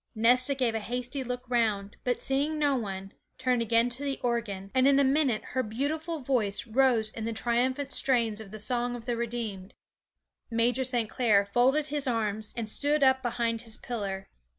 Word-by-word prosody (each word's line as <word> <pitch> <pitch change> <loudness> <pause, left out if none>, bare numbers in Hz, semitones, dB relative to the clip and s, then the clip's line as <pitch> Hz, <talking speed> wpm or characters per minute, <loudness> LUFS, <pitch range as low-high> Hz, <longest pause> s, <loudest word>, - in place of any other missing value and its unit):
Nesta 250 +5 +4
gave 250 -4 0
a 225 - -1
hasty 250 +4 -4
look 250 0 -5
round, 215 -5 0
but 250 -1 0
seeing 285 +3 0
no 290 -2 +2
one, 195 -5 -4 0.3
turned 255 -2 +1
again 230 +1 +3
to 255 +4 -4
the 275 -1 -2
organ, 210 -5 -2
and 260 0 +4
in 280 0 +5
a - - +5
minute 270 -4 +2
her 260 - 0
beautiful 300 +8 -3
voice 235 -7 0
rose 235 -2 +2
in 220 0 -6
the 230 - -2
triumphant 255 +5 0
strains 230 -5 +2
of 210 - -10
the 215 - -8
song 245 +3 -1
of 235 -1 -9
the 240 - -1
redeemed. 225 -5 -4 0.7
Major 240 +2 +1
St. 240 -3 0
Clair 210 -4 +3
folded 255 +8 +2
his 290 -1 -1
arms, 215 -3 0
and 230 -2 -3
stood 290 +6 +1
up 260 0 +4
behind 235 -2 -1
his 225 -1 -4
pillar. 195 -5 -5
240 Hz, 185 wpm, -28 LUFS, 220-260 Hz, 0.7 s, in